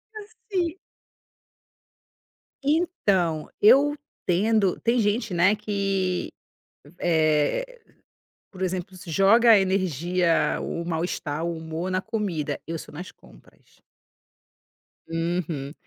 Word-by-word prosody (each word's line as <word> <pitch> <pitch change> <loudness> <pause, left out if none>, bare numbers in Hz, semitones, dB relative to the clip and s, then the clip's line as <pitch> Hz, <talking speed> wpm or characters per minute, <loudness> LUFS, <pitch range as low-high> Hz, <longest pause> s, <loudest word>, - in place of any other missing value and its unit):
Assim. 405 -5 -4 1.8
Então, 200 - +1
eu 275 +7 +6 0.3
tendo 200 +2 +2
tem 235 +1 +2
gente, 205 -1 0
né, 185 +5 +4
que, 195 -3 -1 0.7
eh, 160 - +1 0.7
por 190 - -13
exemplo, 185 0 -3
se 180 - -12
joga 220 +7 +5
a 215 - +8
energia, 180 -2 +1
o 170 - -4
mal-estar, 160 -2 -3
o 170 -1 -2
humor 160 +3 -5
na 185 - +1
comida. 185 -8 -3
Eu 165 0 -4
sou - - -11
nas 175 +5 -8
compras. - - -22 1.3
Uhum, 165 -4 -3
185 Hz, 100 wpm, -25 LUFS, 165-220 Hz, 1.8 s, a